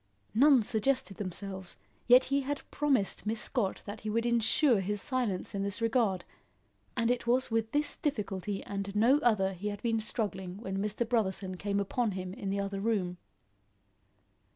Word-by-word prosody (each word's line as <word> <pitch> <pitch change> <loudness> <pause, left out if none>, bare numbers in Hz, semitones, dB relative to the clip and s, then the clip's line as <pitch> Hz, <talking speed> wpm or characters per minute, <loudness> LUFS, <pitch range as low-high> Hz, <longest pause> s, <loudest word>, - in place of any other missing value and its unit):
None 265 0 +6
suggested 220 -2 0
themselves, 190 -1 -3 0.3
yet 250 +1 +8
he 280 +1 +1
had 280 +1 -3
promised 265 -9 +1
Miss 220 +1 0
Scott 210 -6 -1
that 205 +1 -7
he 215 - -4
would 230 +2 0
ensure 235 +1 +3
his 205 +2 -2
silence 245 -7 -2
in 200 - -2
this 200 +1 -2
regard, 225 -5 +1 0.7
and 230 0 +2
it 245 -1 -2
was 250 +1 +2
with 225 0 0
this 295 0 +1
difficulty 205 - -3
and 200 0 -5
no 240 +7 +5
other 205 -8 +2
he 190 +3 -5
had 205 0 -5
been 225 -1 +1
struggling 195 -4 -3
when 195 -3 -4
Mr. 210 +3 -1
Brotherson 195 -5 0
came 200 +2 -1
upon 210 +2 0
him 185 -1 -5
in 195 - -5
the 200 +1 -1
other 200 0 -2
room. 195 -4 0
210 Hz, 170 wpm, -31 LUFS, 195-240 Hz, 0.7 s, yet